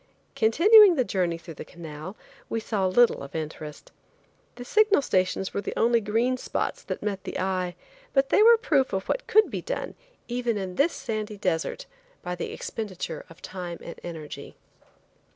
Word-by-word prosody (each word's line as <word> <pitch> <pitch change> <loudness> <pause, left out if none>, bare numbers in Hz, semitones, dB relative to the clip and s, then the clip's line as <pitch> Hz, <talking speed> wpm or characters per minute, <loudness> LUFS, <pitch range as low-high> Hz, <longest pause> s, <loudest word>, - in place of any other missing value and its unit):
Continuing 365 - +7
the 260 - +2
journey 180 -7 -1
through 165 0 -10
the - - -8
canal 165 +2 -9 0.3
we 225 - -1
saw 205 -4 -1
little 240 +6 +4
of 140 +2 -9
interest. 155 -1 -6 0.6
The 245 0 -8
signal 425 - +4
stations 185 -2 0
were 200 - -1
the - - -5
only 235 0 +3
green 230 +5 +1
spots - - -3
that - - -5
met 200 -2 -3
the - - -5
eye, 185 -1 -1 0.4
but 270 0 +2
they 415 - +4
were 460 +1 +8
proof 295 - +1
of 190 0 -2
what - - -2
could 435 0 +4
be - - -3
done, - - -4 0.3
even 240 -2 -1
in 190 -2 -4
this 285 - +2
sandy 215 -2 -4
desert 175 -4 -2 0.4
by 180 - -3
the 180 - -4
expenditure 185 -7 -5
of 165 - -16
time 180 -2 -6
and 170 - -9
energy. 160 -3 -8
205 Hz, 170 wpm, -26 LUFS, 180-255 Hz, 0.6 s, were